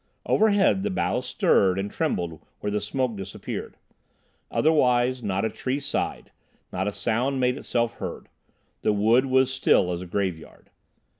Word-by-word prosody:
Overhead 205 Hz, -3 st, +3 dB
the 210 Hz, -, -1 dB
boughs 130 Hz, -9 st, -1 dB
stirred 95 Hz, -7 st, +3 dB
and 100 Hz, +1 st, -3 dB
trembled 85 Hz, -, -2 dB, 0.2 s
where 105 Hz, -, -3 dB
the 105 Hz, 0 st, -1 dB
smoke 125 Hz, +2 st, -1 dB
disappeared. 95 Hz, -1 st, -6 dB, 0.7 s
Otherwise, 125 Hz, -5 st, +2 dB
not 100 Hz, -1 st, -1 dB
a -, -, +1 dB
tree 130 Hz, +2 st, -2 dB
sighed, 140 Hz, -, -3 dB, 0.4 s
not 95 Hz, +2 st, -1 dB
a -, -, 0 dB
sound 125 Hz, +6 st, 0 dB
made 125 Hz, 0 st, +2 dB
itself 120 Hz, -4 st, -1 dB
heard. 95 Hz, -4 st, -6 dB, 0.5 s
The -, -, +2 dB
wood 115 Hz, +6 st, +3 dB
was 130 Hz, 0 st, +3 dB
still 90 Hz, -7 st, +3 dB
as 85 Hz, 0 st, -3 dB
a 90 Hz, -, -7 dB
graveyard. 90 Hz, -4 st, -4 dB
115 Hz, 150 wpm, -25 LUFS, 95-130 Hz, 0.7 s, Overhead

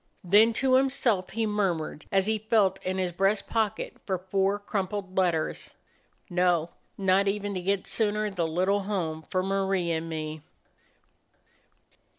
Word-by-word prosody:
Then 205 Hz, +5 st, +5 dB
to 260 Hz, +3 st, +1 dB
himself 255 Hz, -7 st, +2 dB
he 225 Hz, +1 st, -1 dB
murmured, 185 Hz, -8 st, -2 dB
as 195 Hz, -1 st, +3 dB
he 220 Hz, 0 st, 0 dB
felt 210 Hz, -3 st, +2 dB
in 185 Hz, +1 st, -2 dB
his 185 Hz, -1 st, -1 dB
breast 195 Hz, +4 st, +1 dB
pocket 220 Hz, -2 st, -2 dB
for 190 Hz, -2 st, 0 dB
four 195 Hz, +2 st, 0 dB
crumpled 195 Hz, -2 st, -4 dB
letters: 175 Hz, -4 st, -1 dB, 0.5 s
"No, 175 Hz, -2 st, +1 dB, 0.3 s
not 195 Hz, 0 st, +3 dB
even 205 Hz, 0 st, -1 dB
to 185 Hz, -, -3 dB
get 195 Hz, +1 st, 0 dB
sooner 210 Hz, +1 st, 0 dB
the 175 Hz, -4 st, -1 dB
little 185 Hz, +5 st, +1 dB
home 170 Hz, -6 st, -2 dB
for 185 Hz, +3 st, -2 dB
Marie 195 Hz, -2 st, 0 dB
and 165 Hz, 0 st, -2 dB
me!" 155 Hz, -1 st, -5 dB
195 Hz, 145 wpm, -27 LUFS, 180-205 Hz, 0.5 s, Then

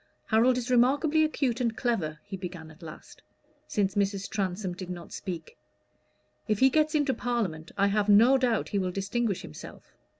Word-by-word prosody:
"Harold 240 Hz, +3 st, +3 dB
is 250 Hz, +1 st, -3 dB
remarkably 285 Hz, +6 st, +3 dB
acute 270 Hz, -5 st, 0 dB
and 230 Hz, -2 st, -1 dB
clever," 185 Hz, -, -1 dB
he 200 Hz, -1 st, -7 dB
began 175 Hz, -4 st, -8 dB
at 160 Hz, +3 st, -18 dB
last, 160 Hz, -2 st, -11 dB, 0.5 s
since 195 Hz, -2 st, 0 dB
Mrs. 200 Hz, 0 st, -1 dB
Transome 190 Hz, -2 st, -2 dB
did 180 Hz, 0 st, -8 dB
not 175 Hz, -2 st, -7 dB
speak. 170 Hz, -5 st, -6 dB, 0.9 s
"If 215 Hz, -, +1 dB
he 265 Hz, +4 st, +5 dB
gets 310 Hz, +1 st, +2 dB
into 290 Hz, -3 st, +2 dB
Parliament, 205 Hz, -12 st, -3 dB
I 200 Hz, -, +3 dB
have 210 Hz, 0 st, +1 dB
no 230 Hz, +6 st, +7 dB
doubt 240 Hz, -4 st, 0 dB
he 200 Hz, -, 0 dB
will 185 Hz, -1 st, -1 dB
distinguish 200 Hz, +2 st, -2 dB
himself. 75 Hz, -, -11 dB
210 Hz, 170 wpm, -28 LUFS, 185-245 Hz, 0.9 s, no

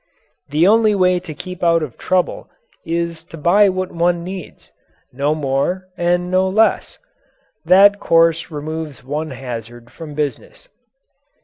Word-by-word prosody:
The 155 Hz, +5 st, +3 dB
only 215 Hz, 0 st, +4 dB
way 180 Hz, -1 st, +3 dB
to 175 Hz, -2 st, -9 dB
keep 180 Hz, +4 st, -8 dB
out 165 Hz, -1 st, +3 dB
of 130 Hz, -7 st, -7 dB
trouble 185 Hz, -1 st, -1 dB, 0.3 s
is 170 Hz, 0 st, -3 dB
to 165 Hz, -, -11 dB
buy 195 Hz, +6 st, +4 dB
what 185 Hz, 0 st, -3 dB
one 170 Hz, 0 st, 0 dB
needs 185 Hz, -1 st, -9 dB, 0.4 s
no 140 Hz, +4 st, 0 dB
more 155 Hz, +6 st, -2 dB
and 175 Hz, 0 st, 0 dB
no 185 Hz, +1 st, +2 dB
less. 220 Hz, +4 st, +1 dB, 0.7 s
That 200 Hz, +2 st, +6 dB
course 165 Hz, 0 st, +2 dB
removes 150 Hz, -4 st, -6 dB
one 150 Hz, +4 st, -4 dB
hazard 120 Hz, -2 st, -8 dB
from 155 Hz, -3 st, -10 dB
business. 155 Hz, -, -5 dB
170 Hz, 135 wpm, -18 LUFS, 150-185 Hz, 0.7 s, That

